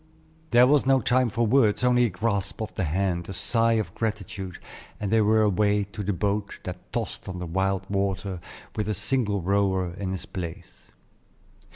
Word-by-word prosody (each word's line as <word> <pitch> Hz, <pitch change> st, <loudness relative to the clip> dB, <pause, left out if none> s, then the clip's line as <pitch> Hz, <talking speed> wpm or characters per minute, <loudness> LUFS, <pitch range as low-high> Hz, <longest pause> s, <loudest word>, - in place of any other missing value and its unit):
There 120 Hz, 0 st, +7 dB
was 140 Hz, 0 st, +3 dB
no 135 Hz, -1 st, +5 dB
time 125 Hz, -1 st, +2 dB
for 115 Hz, +2 st, 0 dB
words, 115 Hz, -1 st, +3 dB
only 125 Hz, 0 st, +4 dB
a -, -, +1 dB
grasp 100 Hz, 0 st, -2 dB
of 110 Hz, -1 st, -4 dB
the 95 Hz, -, -1 dB
hand, 85 Hz, +1 st, -1 dB
a -, -, -4 dB
sigh 115 Hz, +5 st, +2 dB
of 110 Hz, -2 st, -1 dB
gratitude, 100 Hz, -4 st, -4 dB, 0.4 s
and 105 Hz, -1 st, -2 dB
they 110 Hz, 0 st, +4 dB
were 110 Hz, +1 st, +4 dB
away 105 Hz, 0 st, +2 dB
to 105 Hz, -, -5 dB
the 100 Hz, +1 st, -1 dB
boat 100 Hz, +2 st, -2 dB
that 90 Hz, 0 st, -8 dB
tossed 115 Hz, -4 st, -4 dB
on 90 Hz, -, -5 dB
the 90 Hz, -, -4 dB
wild 95 Hz, +2 st, -1 dB
water 100 Hz, -1 st, -1 dB, 0.4 s
with 105 Hz, -1 st, -2 dB
a 105 Hz, -, 0 dB
single 105 Hz, -4 st, 0 dB
rower 95 Hz, -2 st, +1 dB
in 95 Hz, +1 st, -4 dB
his 95 Hz, -1 st, -4 dB
place. 85 Hz, -3 st, -8 dB
100 Hz, 185 wpm, -26 LUFS, 95-110 Hz, 0.4 s, There